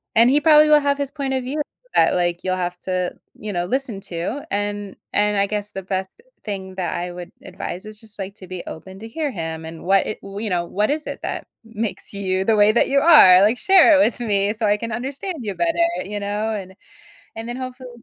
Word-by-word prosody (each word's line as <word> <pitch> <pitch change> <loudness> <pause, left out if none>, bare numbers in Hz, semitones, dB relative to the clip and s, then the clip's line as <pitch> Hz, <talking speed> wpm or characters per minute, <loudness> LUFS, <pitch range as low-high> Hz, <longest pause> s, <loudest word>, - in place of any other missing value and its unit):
And 230 +2 +6
he 290 +3 +3
probably 305 -1 +6
will 300 0 +7
have 280 -1 +1
his 280 -1 -3
point 275 -3 -3
of 260 -1 -1
view 280 +5 -2 0.3
that - - +4
like, 175 -1 0
you'll 185 0 0
have 180 -1 -3
to, 185 -1 -2 0.3
you 210 -1 -5
know, 175 -1 -1
listen 250 -2 -2
to, 185 +11 -5
and 205 0 -2 0.2
and 210 0 +2
I 200 0 +2
guess 210 0 -3
the 195 - -5
best 190 - -4 0.2
thing 190 -3 -6
that 185 -2 -2
I 175 0 -3
would 175 0 -9
advise 180 +4 -7
is 215 0 -10
just, 215 -2 -14
like, 195 0 -5
to 185 - -12
be 185 -1 -6
open 190 +4 -9
to 225 - -8
hear 295 +5 -3
him 160 -5 -5
and 160 0 -9
what 195 +1 +3
it - - -5
you 200 +2 -5
know, 175 -2 0
what 205 +4 0
is 305 +1 -3
it - - -5
that - - -4 0.2
makes 225 -2 -5
you 190 -1 -1
the 225 - +3
way 210 0 +5
that 235 - +3
you 275 +1 +4
are? 275 - +8
Like, 215 +5 +4
share 355 -2 +6
it - - +6
with 240 - -2
me 205 -3 +1
so 220 0 -2
I 205 0 +3
can 230 +1 -5
understand 275 - -4
you 210 -4 -3
better, 340 0 +2 0.2
you 205 +1 -4
know? 205 +2 -2
And 190 -3 -6 0.6
and 225 +1 -6
then, 240 - -4
hopefully, 255 0 -7
210 Hz, 235 wpm, -21 LUFS, 190-255 Hz, 0.6 s, are